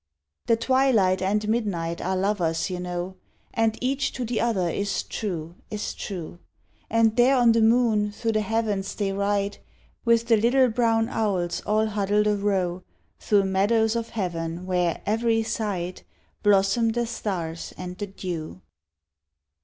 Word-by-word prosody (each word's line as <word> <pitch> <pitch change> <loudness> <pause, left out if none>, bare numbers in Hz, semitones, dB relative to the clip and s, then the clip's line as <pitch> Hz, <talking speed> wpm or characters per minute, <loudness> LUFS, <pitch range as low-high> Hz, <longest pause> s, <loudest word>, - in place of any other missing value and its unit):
The 230 - +5
twilight 230 -7 +3
and 210 +3 0
midnight 190 -7 -1
are 190 +1 -1
lovers, 185 -4 0
you 180 - -3
know, 180 +1 -4 0.4
And 225 -1 +1
each 265 +2 0
to 250 - -3
the 230 -1 -1
other 205 -7 +1
is 200 +4 -1
true, 170 -6 -4 0.2
is 210 -1 -4
true! 175 -3 -6 0.5
And 225 -1 +3
there 250 +3 +5
on 240 -2 +5
the 230 0 +3
moon 220 -2 +3
through 225 +2 -2
the 215 -1 +1
heavens 210 -2 -1
they 195 -2 -1
ride, 200 0 -1 0.4
With 235 -1 +3
the 230 -1 +4
little 250 +4 +4
brown 225 -1 +2
owls 185 -7 -1
all 215 +1 +2
huddled 210 0 +1
arow, 195 -4 0 0.4
Through 205 -2 +3
meadows 215 +4 +2
of 230 0 -2
heaven 170 -4 -3
where, 180 -3 0
every 225 +1 +1
side, 190 -5 -3 0.4
Blossom 205 +3 +3
the 240 0 0
stars 175 -8 -4
and 180 0 -6
the 205 - -3
dew. 170 - -6
205 Hz, 145 wpm, -25 LUFS, 185-225 Hz, 0.5 s, The